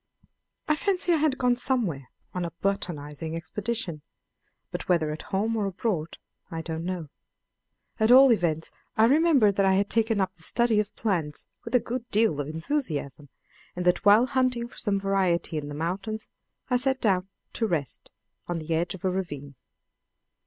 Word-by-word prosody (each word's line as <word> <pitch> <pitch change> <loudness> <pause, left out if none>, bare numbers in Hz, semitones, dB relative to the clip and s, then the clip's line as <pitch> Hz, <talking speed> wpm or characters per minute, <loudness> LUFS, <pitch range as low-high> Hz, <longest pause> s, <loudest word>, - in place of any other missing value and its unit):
I 305 - +3
fancy 360 0 +1
I - - +4
had 300 -3 +1
gone 250 -1 +3
somewhere 225 - -1 0.2
on 180 - -2
a 170 - -2
botanizing 160 -4 -3
expedition, 175 0 -3 0.7
but - - -5
whether 160 -4 +2
at 155 - -5
home 215 +4 -1
or 210 -3 0
abroad 180 -4 -2 0.3
I 165 -1 -5
don't 160 0 -4
know. 175 -4 -4 0.9
At 220 0 +3
all 260 +1 +9
events, 165 -7 0 0.3
I 220 - +6
remember 280 -5 +5
that 195 0 +1
I 190 0 +4
had 200 +1 +1
taken 225 -2 +2
up 190 -1 0
the 165 - -17
study 235 +5 +2
of 210 0 -2
plants 170 -9 -2 0.2
with - - -3
a - - +7
good 240 +1 -5
deal 210 -8 +2
of 145 - -2
enthusiasm, 155 - -3 0.5
and 180 0 -3
that 180 0 +3
while 210 +4 +7
hunting 255 -2 0
for - - -17
some 200 -3 0
variety 185 -5 +1
in 145 - -7
the 145 - -6
mountains 195 +7 -3 0.4
I 250 - +2
sat 265 +1 +1
down 190 -4 +1 0.2
to 225 - 0
rest 155 - -3 0.4
on 175 - -2
the 165 0 -3
edge 175 +3 0
of 190 - -8
a 185 - +2
ravine. 145 -7 -4
195 Hz, 175 wpm, -27 LUFS, 165-235 Hz, 0.9 s, all